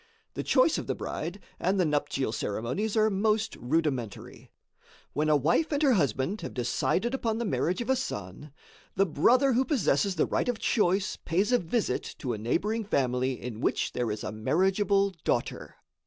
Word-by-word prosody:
The - - -3
choice - - +3
of - - -7
the - - -1
bride 170 +6 -5 0.2
and 190 +2 +1
the 180 - +3
nuptial 145 -5 0
ceremonies 125 - -2
are 215 0 +4
most 215 +2 +1
rudimentary. 130 -5 -3 0.6
When 155 +2 0
a 150 - +5
wife 165 - +2
and 290 +1 0
her 275 -3 +5
husband 145 - 0
have - - -7
decided 155 - 0
upon 230 -4 -1
the 235 - -2
marriage 185 -1 0
of 240 - -5
a - - +4
son, 115 - -5 0.4
the 195 - +3
brother 250 - +3
who 250 +3 +3
possesses 200 - +1
the 160 - +2
right - - -1
of 245 - 0
choice, 195 -3 +1
pays 190 +7 0
a 245 - +4
visit 175 - -2
to 125 - -3
a 110 - -5
neighboring 210 - 0
family 130 - 0
in 120 -3 -6
which - - 0
there 120 -2 -1
is 105 0 -4
a - - -3
marriageable 195 - +2
daughter. - - -2
180 Hz, 180 wpm, -28 LUFS, 130-220 Hz, 0.6 s, a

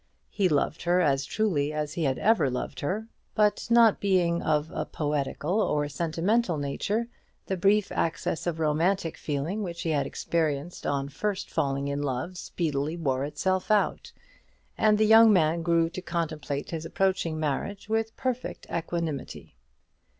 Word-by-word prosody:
He 195 -3 +2
loved 155 +1 0
her 175 +1 +2
as 140 -5 +2
truly 165 -10 0
as 150 -1 -3
he 165 -2 -1
had 130 -2 +1
ever 215 -9 +3
loved 125 - -4
her; 205 +9 -2 0.3
but 210 -1 +2
not 235 -2 +6
being 180 -4 +2
of 150 0 0
a - - -1
poetical 150 +6 -1
or 150 -6 +1
sentimental 170 - 0
nature, 200 +11 -1 0.4
the 190 - -1
brief 200 +3 +2
access 165 +1 -1
of 165 -2 -2
romantic 165 +3 +1
feeling 155 +8 -3
which 175 -4 -5
he 165 - 0
had 140 -3 +1
experienced 160 0 -2
on 140 -1 0
first 200 +7 -3
falling 140 0 0
in 140 0 -2
love 140 +6 -3
speedily 155 -3 -2
wore 135 -4 0
itself 185 +6 -1
out, 210 -1 +1 0.6
and 215 -1 +3
the 215 - +4
young 225 +1 +8
man 165 -3 +3
grew 165 0 +2
to 185 - -6
contemplate 155 -5 -3
his 165 -1 -4
approaching 170 -2 0
marriage 155 +8 -3
with 225 0 -1
perfect 255 -1 -3
equanimity. 165 -4 -4
165 Hz, 155 wpm, -27 LUFS, 145-195 Hz, 0.6 s, young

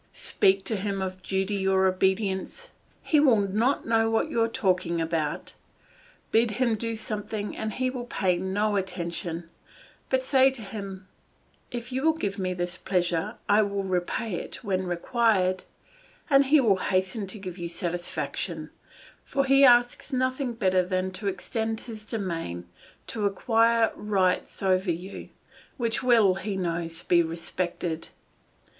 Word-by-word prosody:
Speak 195 0 +2
to 225 - 0
him 195 0 -2
of 185 -1 -4
duty 190 +1 -1
or 190 0 +3
obedience; 190 - 0 0.3
he 305 - +3
will 265 -6 +5
not 215 +7 +1
know 225 0 +2
what 225 0 0
you 230 - +1
are 225 - +4
talking 180 -6 0
about; 160 -2 -2 0.8
bid 230 +1 +4
him 250 -3 +2
do 230 +1 -2
something 215 -1 -4
and 215 -1 -3
he 255 0 0
will 245 -2 -6
pay 185 -6 +1
no 205 +3 0
attention; 170 -2 -4 0.6
but 260 0 +1
say 265 0 +5
to 260 -4 -7
him, 195 -2 -7 0.6
"If 240 +1 -6
you 260 +1 -1
will 320 +2 +4
give 200 -8 -3
me 185 -1 -1
this 175 +1 -3
pleasure, 180 +3 0
I 205 +1 +5
will 200 -1 -1
repay 185 +3 -2
it - - -6
when 190 -2 -1
required," 185 0 +1 0.7
and 275 0 +6
he 300 +2 +6
will 215 -7 +4
hasten 190 +2 -1
to 205 - -6
give 185 -2 -7
you 170 0 -4
satisfaction, 175 +1 -4 0.5
for 275 -1 0
he 275 +1 +5
asks 245 +2 +5
nothing 255 0 0
better 190 -5 +2
than 185 +1 -1
to 200 +2 -5
extend 220 +3 -2
his 220 -3 -9
domain, 165 - -4 0.4
to 210 -3 -1
acquire 225 +3 +3
rights 195 -2 0
over 190 0 +2
you, 175 +3 -5 0.5
which 235 -3 0
will, 230 -6 +5
he 195 +1 -4
knows, 170 -2 -3
be 175 -1 +4
respected. 165 0 -3
195 Hz, 150 wpm, -27 LUFS, 185-230 Hz, 0.8 s, and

